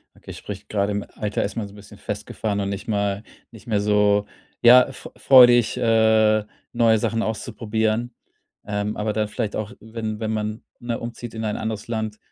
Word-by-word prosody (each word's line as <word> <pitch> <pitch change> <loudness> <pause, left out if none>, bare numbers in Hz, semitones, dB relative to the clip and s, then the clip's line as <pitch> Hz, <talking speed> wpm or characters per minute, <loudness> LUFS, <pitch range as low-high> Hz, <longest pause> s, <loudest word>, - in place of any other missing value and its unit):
Okay, - - -11
spricht - - -9
gerade 100 -1 0
im 105 0 -3
Alter 105 -1 -2
ist 100 - -4
man 110 -3 -3
so 100 - -15
'n - - -15
bisschen 105 0 -14
festgefahren 105 -2 -4
und 100 - -2
nicht 100 +5 -5
mal 100 -1 -1 0.3
nicht 115 -1 -15
mehr 105 -3 +1
so, 105 0 +3 0.4
ja, 125 +1 +8
f 135 - -10
freudig, 120 -3 +6
äh, 110 -1 +3 0.3
neue 115 -2 +4
Sachen 115 +1 -1
auszuprobieren. 110 +1 -2 0.5
Ähm, 105 +1 -3
aber 105 0 -1
dann 110 0 0
vielleicht 105 -1 -3
auch, 110 +1 -4
wenn 110 -1 -5
wenn 110 -1 -2
man, 110 0 -3 0.2
ne, 120 -1 -3
umzieht 120 0 -7
in 110 0 -4
ein 105 - -2
anderes 110 -1 -4
Land 110 -2 -3
110 Hz, 185 wpm, -23 LUFS, 105-115 Hz, 0.5 s, ja